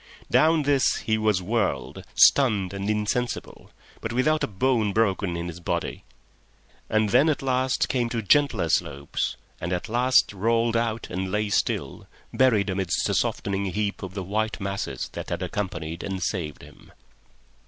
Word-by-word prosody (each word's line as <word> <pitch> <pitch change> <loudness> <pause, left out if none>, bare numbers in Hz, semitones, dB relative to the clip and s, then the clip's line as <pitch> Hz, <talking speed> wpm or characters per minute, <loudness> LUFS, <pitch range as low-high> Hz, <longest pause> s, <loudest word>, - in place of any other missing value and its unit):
Down 160 0 +4
this 140 -2 +3
he 110 -1 0
was 105 -4 +1
whirled, 110 +4 -1
stunned 105 -9 +4
and 100 +1 -3
insensible, 105 +3 -2 0.3
but 110 - -4
without 155 +6 +1
a - - +1
bone 110 0 +1
broken 100 -5 +1
in 85 +1 -4
his 85 0 -7
body; 85 - -3 0.8
and 110 -1 +2
then 135 +6 +5
at 145 -3 -1
last 130 0 +1
came 120 -3 0
to 115 -1 -2
gentler 140 - +3
slopes, 70 -2 -1 0.2
and 85 - -4
at 90 +4 -2
last 125 0 +3
rolled 115 +3 +1
out 115 -1 -1
and 95 +1 -3
lay 105 +1 0
still, - - -1 0.3
buried 110 -7 +3
amidst 95 -2 0
a - - +1
softening 100 0 -1
heap 100 +2 -2
of 95 -1 -7
the 95 - -3
white 110 +4 -2
masses 100 0 -3
that - - -7
had - - -3
accompanied 85 -5 -4
and 95 -1 -4
saved 80 -8 -3
him. - - -16
105 Hz, 160 wpm, -25 LUFS, 95-120 Hz, 0.8 s, then